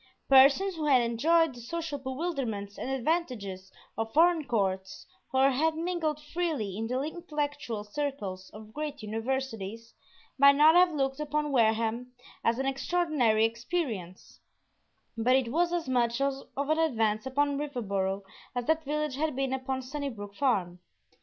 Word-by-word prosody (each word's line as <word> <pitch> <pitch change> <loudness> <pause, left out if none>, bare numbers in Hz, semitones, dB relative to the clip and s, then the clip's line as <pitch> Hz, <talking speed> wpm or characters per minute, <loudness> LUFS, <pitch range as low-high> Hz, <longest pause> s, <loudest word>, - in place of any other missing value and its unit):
Persons 275 +9 +6
who 310 - -2
had 265 -3 +6
enjoyed 310 +7 +2
the 240 - -11
social 315 +3 -4
bewilderments 260 - -4
and - - -4
advantages 245 - -2 0.2
of 225 +1 -3
foreign 330 -1 +4
courts, 190 -4 -2 0.3
or 265 0 +4
had 315 +5 +1
mingled 325 -3 -1
freely 300 - -3
in 225 +2 -3
the 250 +2 -1
intellectual 290 -8 -4
circles 210 -6 -4
of 215 0 -12
great 295 -3 -5
universities, 225 -1 -4 0.5
might 280 0 +8
not 305 +2 +7
have 355 0 +6
looked 270 -2 -1
upon 300 0 -1
Wareham 230 0 +1 0.3
as 230 0 +2
an 270 - -1
extraordinary 270 -6 +2
experience; 230 - -4 0.8
but 235 +3 +3
it 255 -3 +1
was 340 +4 +2
as 345 -4 -2
much 240 -1 +1
of 275 0 +1 0.2
an 295 +3 +1
advance 225 -7 +1
upon 285 +1 0
Riverboro 200 -9 -2 0.3
as 245 -1 -2
that 315 +2 +1
village 300 -1 -2
had 305 -2 -1
been 270 0 -1
upon 260 0 -3
Sunnybrook 255 -7 -5
Farm. 195 -9 0
265 Hz, 145 wpm, -29 LUFS, 225-300 Hz, 0.8 s, might